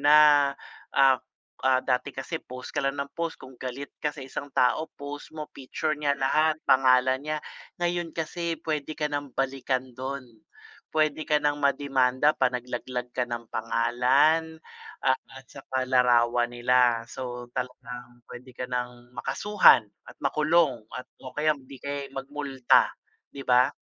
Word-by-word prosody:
na, 145 -1 +6 0.4
ah 135 -1 +6 0.5
ah, 130 -1 +5
dati 125 +1 0
kasi 135 +5 -4
post 125 0 -9
ka - - -3
lang 135 0 -1
nang 140 - -11
post, 165 -1 -3
kung 130 0 -13
galit 130 +2 -5
ka 150 - 0
sa 140 - -7
isang 135 +2 -6
tao 130 +5 +2
post 145 +1 -7
mo, 150 - -4
picture 140 +3 -3
niya 145 -1 0
lahat, 155 +3 +2
pangalan 130 0 +4
niya. 155 +1 -3 0.4
Ngayon 175 -1 -1
kasi 165 +1 -2
puwede 155 -1 -3
ka 150 - +1
ng 145 -1 -3
balikan 130 -1 -1
do'n, 130 +1 -5 0.6
puwede 155 0 +1
ka 150 - +3
ng 145 0 +1
ma-demanda 135 0 +2
pag 130 -1 +2
naglaglag 125 0 -5
ka 125 - 0
ng 120 -1 -5
pangalan 130 +8 +2 0.4
at 130 -1 +3 0.3
saka 130 -1 -4
larawan 120 -1 +3
nila. 120 -1 +3
So 125 0 -6
talagang 125 -1 -7
puwede 125 +1 -11
ka 125 - -3
ng 125 -1 -5
makasuhan 135 - +4 0.2
at - - -14
makulong 155 -5 +2
at 125 +1 -6 0.2
o 130 - -7
kaya 155 0 +2
hindi 135 -1 -13
kaya'y 140 0 -5
mag 135 0 -6
multa, 140 -3 +2 0.4
'di 140 -1 -9
ba? 125 0 +5
135 Hz, 150 wpm, -27 LUFS, 125-150 Hz, 0.6 s, na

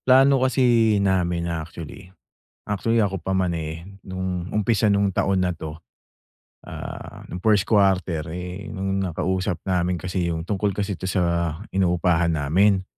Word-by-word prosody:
plano 135 +1 +6
kasi 120 -4 +3
namin 90 -3 +1
actually 85 +3 -7 0.6
actually 115 +3 +1
ako 95 -2 +1
pa 95 +1 -4
man, 90 -2 +1
eh, 80 +3 -6 0.2
nung 95 -1 -3
umpisa 105 0 +2
nung 100 0 +3
taon 95 0 +1
na 90 -1 0
'to, 80 0 -7 0.9
ah, - - -8
nung 90 - -5
first 105 0 +3
quarter, 95 -7 +2
eh, 90 +3 -6
nung 95 0 -1
nakausap 95 0 -1
namin 90 -1 0
kasi 90 +1 -2
yung 80 - -3
tungkol 100 +2 -1
kasi 100 -2 -2
ito 95 - -4
sa 85 -3 0 0.2
inupahan 85 -2 +2
namin. 95 +7 +3
95 Hz, 145 wpm, -23 LUFS, 85-100 Hz, 0.9 s, plano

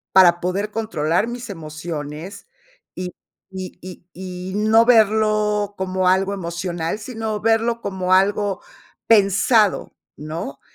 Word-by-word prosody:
para 175 -2 +7
poder 195 +4 -2
controlar 205 -4 0
mis 240 0 -6
emociones 155 - -7 0.5
y 180 0 -4 0.4
y 185 -1 -7
y 185 -1 -10
y 185 0 -7
no 220 +2 +4
verlo 215 -2 +3
como 185 0 -1
algo 190 +2 +2
emocional, 170 0 -3
sino 220 -2 -4
verlo 225 +1 +1
como 185 -1 -1
algo 200 +1 +2 0.5
pensado, 210 0 +3 0.2
¿no? 155 -2 -6
190 Hz, 110 wpm, -21 LUFS, 180-215 Hz, 0.5 s, para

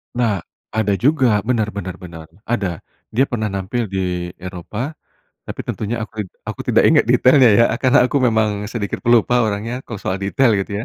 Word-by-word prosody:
Nah, 115 -5 +1 0.3
ada 110 -2 0
juga. 120 - +2
Benar 115 -3 0
benar 90 -3 -5
benar, 85 -4 -10 0.2
ada. 100 -8 -1 0.3
Dia 130 +5 +2
pernah 110 -4 -2
nampil 100 +5 -2
di 90 -2 -2
Eropa, 95 - -6 0.5
tapi - - -5
tentunya 110 +3 -3
aku 110 -1 -8
id 100 - -5 0.2
aku - - -6
tidak - - +4
ingat - - +5
detailnya, 130 -1 +5
ya, 115 - +6 0.2
karena 130 0 +4
aku 125 - -1
memang 110 -4 +1
sedikit 110 -3 -4
pelupa 120 0 +3
orangnya 110 +3 -2
kalau 115 - -7
soal 95 -1 -3
detail 115 +5 +2
gitu, 100 +3 -4
110 Hz, 170 wpm, -19 LUFS, 95-120 Hz, 0.5 s, ya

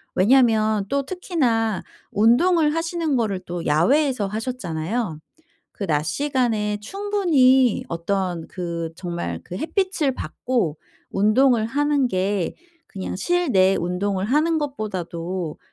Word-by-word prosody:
왜냐하면 220 -2 +3
또 280 -1 0
특히나 245 - 0 0.3
운동을 300 - +3
하시는 330 -2 -1
거를 215 -6 0
또 175 -1 -5
야외에서 215 - +2
하셨잖아요. 210 -4 -3 0.5
그 205 - -5
낮 150 -2 +1
시간에 225 - 0
충분히 290 - +2
어떤 175 0 -2
그 170 -2 -4
정말 170 - -4
그 180 - -7
햇빛을 330 - 0
받고 230 - -2 0.3
운동을 220 +3 +3
하는 290 +1 +1
게 190 -2 -1 0.3
그냥 190 -2 -5
실내 205 - +2
운동을 185 +2 -1
하는 310 +7 +2
것보다도 185 - -4
220 Hz, 245 characters per minute, -22 LUFS, 185-280 Hz, 0.5 s, 왜냐하면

